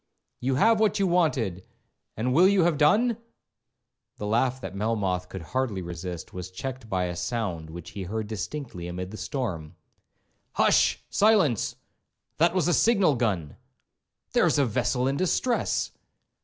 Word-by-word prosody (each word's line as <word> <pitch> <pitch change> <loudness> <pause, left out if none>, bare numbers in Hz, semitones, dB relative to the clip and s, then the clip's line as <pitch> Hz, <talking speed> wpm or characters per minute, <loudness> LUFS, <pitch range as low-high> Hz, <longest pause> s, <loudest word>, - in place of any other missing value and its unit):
—You 130 +1 0
have 220 - +4
what 215 -3 +2
you 200 - +2
wanted, 140 - +1 0.5
and 125 +3 0
will 175 +7 +6
you 195 -2 +4
have 165 -4 +1
done?' 220 +10 +4 1.0
The 105 - -5
laugh 120 +4 +1
that 125 - -7
Melmoth 100 -4 -1
could 95 -3 -7
hardly 105 - -2
resist, 85 0 -6
was 90 0 -6
checked 125 +5 -6
by 95 -2 0
a 90 -1 -3
sound 90 -7 -3
which 85 +1 -9
he 100 - -6
heard 110 +4 -3
distinctly 105 - -5
amid 90 +1 -5
the 110 - -7
storm. 95 - -4 0.8
'Hush—silence! 200 - +3 0.6
that 170 +2 +3
was 175 -4 +2
a 175 - +3
signal 200 -8 +4
gun!—there 100 - -3
is - - +2
a 140 - +4
vessel 125 +2 0
in 135 +1 0
distress.' 235 - 0
115 Hz, 145 wpm, -26 LUFS, 90-155 Hz, 1.0 s, will